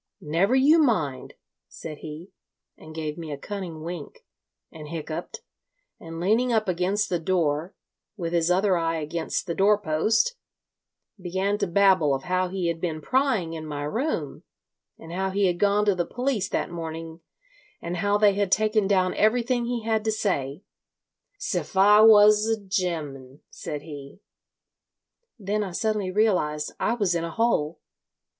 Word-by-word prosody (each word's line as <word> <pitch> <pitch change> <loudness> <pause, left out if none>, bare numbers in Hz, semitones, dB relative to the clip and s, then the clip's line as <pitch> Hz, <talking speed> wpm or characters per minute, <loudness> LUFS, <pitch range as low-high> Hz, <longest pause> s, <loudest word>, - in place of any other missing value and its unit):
'Never 175 +11 +1
you 290 +5 +5
mind,' 160 - 0 0.3
said 155 - -9
he, 155 +4 -9 0.4
and 155 0 -13
gave 155 0 -4
me 160 -2 -6
a 145 - -4
cunning 175 -2 -6
wink, 170 -3 -8 0.5
and 155 -2 -10
hiccuped, 160 +1 -6 0.6
and 165 0 -8
leaning 225 +8 +2
up 220 -2 +1
against 185 +3 0
the 175 - -1
door, 165 -1 -1 0.4
with 170 -3 -4
his 170 0 +2
other 190 +1 +3
eye 165 -1 0
against 160 +2 -3
the 170 - -3
door 205 +4 +4
post, 210 - +1 0.8
began 190 +3 -1
to - - 0
babble 180 -5 +4
of 135 - -6
how 185 +1 0
he 180 -1 -2
had 165 -1 -2
been 160 -3 -2
prying 225 - 0
in 160 -1 -6
my 145 -2 -5
room, 240 - -3 0.6
and 165 +1 -10
how 190 +1 -1
he 200 +1 +1
had 175 -1 0
gone 205 +1 +3
to 205 - +4
the 180 -2 -1
police 245 -2 -2
that - - -2
morning, 165 -1 -6 0.6
and 170 +1 -4
how 205 +4 +1
they 205 -1 +4
had 200 -1 -1
taken 215 -1 +2
down 185 -2 +2
everything 240 +2 +1
he 240 -1 -3
had 220 -1 0
to 220 - 0
say—''siffiwas 210 - +2
a 225 - +1
ge'm,' 160 -9 -4
said 145 -1 -6
he. 145 0 -10 1.2
Then 210 0 -2
I 190 -3 -6
suddenly 215 -1 -1
realised 180 -7 0
I 235 - +1
was 200 -6 +1
in 170 -1 -1
a 170 - -3
hole. 165 -6 0
185 Hz, 155 wpm, -25 LUFS, 160-210 Hz, 1.2 s, you